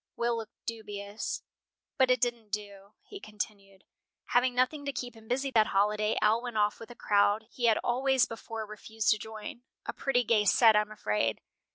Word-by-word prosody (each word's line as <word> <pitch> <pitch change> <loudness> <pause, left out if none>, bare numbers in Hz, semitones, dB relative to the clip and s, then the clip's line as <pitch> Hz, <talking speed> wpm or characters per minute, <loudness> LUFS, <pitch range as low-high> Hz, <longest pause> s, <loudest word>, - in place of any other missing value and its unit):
Will 235 0 0
looked 225 -1 -9
dubious. 205 -2 -5 0.6
"But 260 -1 +5
it 255 -1 +4
didn't 235 -2 -1
do," 205 -1 -6
he 400 - -10
continued. 205 - -7 0.5
"Having 245 0 +3
nothing 255 +4 +1
to 280 - -1
keep 245 -2 -5
him 220 0 -16
busy 265 +3 -1
that 220 -3 +4
holiday, 210 +2 +1
Al 220 +2 +4
went 240 -3 -5
off 210 0 +2
with 230 - -10
a 240 - -10
crowd 205 +1 +2
he 245 - -2
had 225 -2 +5
always 260 +1 +3
before 225 -1 -6
refused 215 +1 -1
to 215 - +2
join 220 +1 -8 0.2
a - - -3
pretty 250 -3 +1
gay 215 -2 +3
set, 220 +2 +6
I 210 - +6
am 210 - -6
afraid. 110 - -1
220 Hz, 190 wpm, -30 LUFS, 210-245 Hz, 0.6 s, set